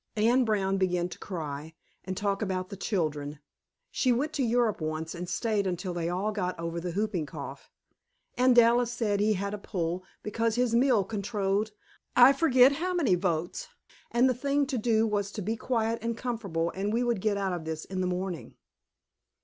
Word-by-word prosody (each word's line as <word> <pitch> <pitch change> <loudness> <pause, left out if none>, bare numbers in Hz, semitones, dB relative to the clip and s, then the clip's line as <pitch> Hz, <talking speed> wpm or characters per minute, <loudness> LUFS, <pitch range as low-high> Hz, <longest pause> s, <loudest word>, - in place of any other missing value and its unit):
Anne 235 +4 +4
Brown 195 -4 +1
began 180 -2 +1
to - - -10
cry, 155 -3 -6 0.3
and 185 0 -4
talk 200 0 -1
about 185 -3 -2
the 200 - -6
children. 155 -7 -2 0.5
(She 255 - +2
went 285 +6 0
to 280 - -1
Europe 235 -5 +1
once 155 +1 -3
and 175 0 -6
stayed 205 +1 0
until 180 0 -3
they 170 -1 -2
all 190 +5 -1
got 185 -3 -2
over 165 0 -3
the 175 +1 -4
whooping 195 -5 -1
cough.) - - -8 0.7
And 250 0 +4
Dallas 240 0 +5
said 215 -4 0
he 215 +1 +3
had 200 +1 -3
a 210 - -4
pull, 175 -2 -3 0.2
because 225 +1 0
his 245 -1 +1
mill 240 -3 +4
controlled 200 0 -1 0.5
I 250 +3 +8
forget 265 -3 +5
how 355 +6 -2
many 285 - +3
votes, 175 -2 -1 0.4
and 240 +2 +4
the 255 - +3
thing 280 +3 +1
to 250 - +1
do 220 0 +2
was 205 -2 -1
to 210 - -4
be 220 +4 -1
quiet 230 -1 -1
and 230 0 -2
comfortable 200 -10 -2
and 200 +2 -2
we 235 +3 +1
would 235 -5 0
get 210 -1 +1
out 185 -4 -2 0.3
in 185 -1 -1
the 185 - 0
morning. 180 -1 -4
205 Hz, 185 wpm, -28 LUFS, 180-235 Hz, 0.7 s, I